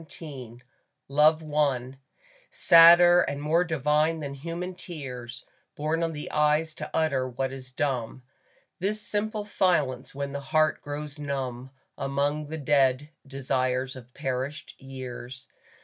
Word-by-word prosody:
XXIX 135 -7 -10 0.5
LOVE 155 +2 +3
I 135 -3 0 0.5
SADDER 175 +1 +7
and 140 - -2
more 155 +4 +2
divine 155 0 +1
than 140 -2 -5
human 170 +6 -5
tears 125 -9 -8 0.3
Born 155 +3 -1
on 165 -1 0
the 150 -1 -7
eyes 150 +1 +2
to - - -7
utter 135 -5 0
what 130 +2 -3
is 130 -1 -9
dumb, 130 -2 -3 0.6
This 205 +4 -1
simple 210 +1 -3
silence 150 -12 0
when 140 0 -4
the 140 - -4
heart 155 +2 +1
grows 145 +1 -6
numb 130 -3 -4 0.3
Among 140 +2 -1
the 160 +2 -5
dead 140 0 +2 0.2
desires 130 -1 -1
of 125 -1 -12
perished 135 +1 -4
years. 130 -1 -9
145 Hz, 130 wpm, -27 LUFS, 130-160 Hz, 0.6 s, SADDER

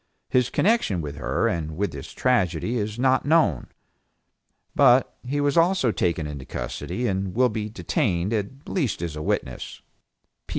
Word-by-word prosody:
His 125 -2 +3
connection 205 - +2
with 75 -2 -6
her - - 0
and 80 -1 -3
with 100 -2 0
this 70 -2 -8
tragedy 115 -3 +1
is 105 -1 -2
not 130 +1 +3
known, 150 - +2 1.1
but 130 -2 +4
he 135 +3 -2
was 145 +1 +1
also 170 -7 +3
taken 85 -5 0
into 75 -3 -6
custody, 65 - -4
and 95 -3 -1
will 125 +1 +4
be 110 -1 -3
detained 105 - -1
at 110 +6 -4
least 135 - -1
as 80 -3 -4
a 75 - -5
witness. 65 -4 -3
110 Hz, 155 wpm, -24 LUFS, 85-130 Hz, 1.1 s, but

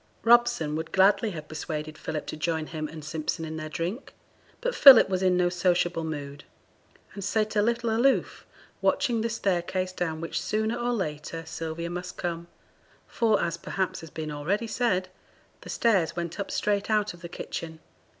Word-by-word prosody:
Robson 230 -10 +4
would 160 +1 -4
gladly 200 +4 +4
have 155 -5 -7
persuaded 155 -1 -5
Philip 155 0 -4
to - - -5
join 160 0 -1
him 155 -1 -4
and 155 -1 -9
Simpson 160 +1 -3
in 160 0 -5
their 155 0 -5
drink, 175 - -4 0.4
but - - -1
Philip 265 - +9
was 185 -1 0
in 185 -1 +3
no 180 0 +3
sociable 175 -2 +1
mood, 145 -2 -6 0.7
and 200 - -6
sate 215 +2 0
a 205 - +4
little 235 +1 0
aloof, 265 +4 +2 0.4
watching 245 -6 +2
the 230 - -1
staircase 185 -3 -1
down 165 -3 -3
which 165 - -3
sooner 220 +2 -1
or 240 0 -1
later 165 -5 -4
Sylvia 165 +1 -5
must 180 +1 -6
come; 170 -1 -4 0.6
for, 220 -3 +2
as 170 -1 -2
perhaps 190 +2 -2
has 165 - -10
been 155 0 -5
already 175 +10 -1
said, 215 -5 0 0.5
the - - -11
stairs 195 -8 +2
went 170 0 -4
up 200 - -3
straight 205 0 0
out 210 -3 +1
of 175 - -15
the 170 - -7
kitchen. 160 -1 -6
175 Hz, 175 wpm, -27 LUFS, 160-215 Hz, 0.7 s, Philip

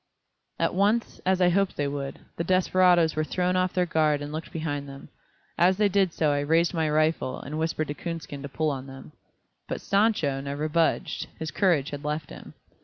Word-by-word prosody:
At - - 0
once, 205 +5 +1
as 190 0 +2
I 180 - +5
hoped 195 +2 +1
they 145 - 0
would, 140 -1 -4 0.2
the 170 - -2
desperadoes 180 -2 +3
were 155 - +1
thrown 180 +3 0
off 185 0 +1
their 180 -1 +2
guard 155 -3 +2
and 145 - -6
looked 155 +1 -6
behind 145 -3 -3
them. 135 0 -11 0.5
And 175 +2 +6
as 185 - 0
they 210 -1 +3
did 195 -2 +2
so 155 -2 +1
I 145 - +1
raised 165 +5 +2
my 160 -2 0
rifle 155 -3 +1
and 150 +3 -5
whispered 160 -1 -1
to - - -1
Coonskin 165 -3 -6
to 140 - -6
pull 155 +2 0
on 135 -1 -5
them. 135 - -11 0.6
But - - -3
"Sancho" 195 -10 +1
never 140 +2 -3
budged, 165 +1 0
his 160 -1 -5
courage 170 -9 +2
had 145 0 -6
left 150 0 -3
him. - - -11
160 Hz, 205 wpm, -26 LUFS, 145-180 Hz, 0.6 s, And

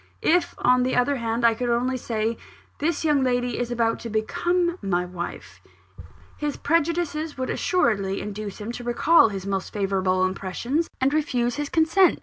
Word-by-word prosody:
If, 345 +1 +2
on 250 0 +3
the 255 +1 0
other 260 +3 +2
hand, 230 0 -1
I 230 - +6
could 245 +2 -3
only 245 +2 +1
say, 230 -2 -2 0.4
'This 320 +1 -1
young 295 -3 +3
lady 245 -1 0
is 245 -1 -2
about 230 -1 0
to 235 - -6
become 345 - 0
my 180 -2 0
wife,' 175 -1 -7 0.8
his 295 -1 -3
prejudices 325 -1 0
would 260 0 -2
assuredly 200 - +1
induce 210 -1 -6
him 210 +2 -5
to 240 0 -7
recall 240 +3 +4
his 195 -2 -6
most 195 -1 -2
favourable 190 -2 +1
impressions, 195 - -2
and 270 +2 +2
refuse 250 -6 0
his 295 -1 -3
consent. 330 +3 +4
245 Hz, 165 wpm, -24 LUFS, 215-300 Hz, 0.8 s, I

